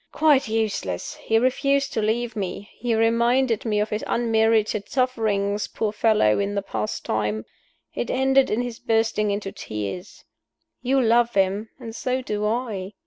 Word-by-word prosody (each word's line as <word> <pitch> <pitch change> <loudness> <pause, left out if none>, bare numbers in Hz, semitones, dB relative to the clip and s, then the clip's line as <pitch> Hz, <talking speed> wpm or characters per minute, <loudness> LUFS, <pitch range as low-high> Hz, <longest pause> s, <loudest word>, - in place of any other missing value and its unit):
Quite 295 -5 +3
useless! 215 - -2
He 225 - +2
refused 275 +3 +1
to 220 - 0
leave 230 +2 -1
me; 200 0 -5
he 240 -2 -1
reminded 235 +1 +2
me 210 -2 +1
of 210 +1 -1
his 210 +1 -2
unmerited 220 -2 +1
sufferings, 215 -6 0
poor 215 -2 -2
fellow, 210 - +3
in 200 0 -1
the 200 - -1
past 110 - -4
time. 110 0 -1 0.5
It 120 - -3
ended 265 +1 +3
in 225 +3 0
his 240 -2 -6
bursting 225 -2 +1
into 200 -1 -2
tears. 105 - -6 0.6
You 265 +2 +2
love 235 -1 +3
him, 195 +3 +1
and 225 -3 -8
so 255 +1 -2
do 210 -2 -2
I. 215 -4 -3
220 Hz, 155 wpm, -24 LUFS, 200-240 Hz, 0.6 s, Quite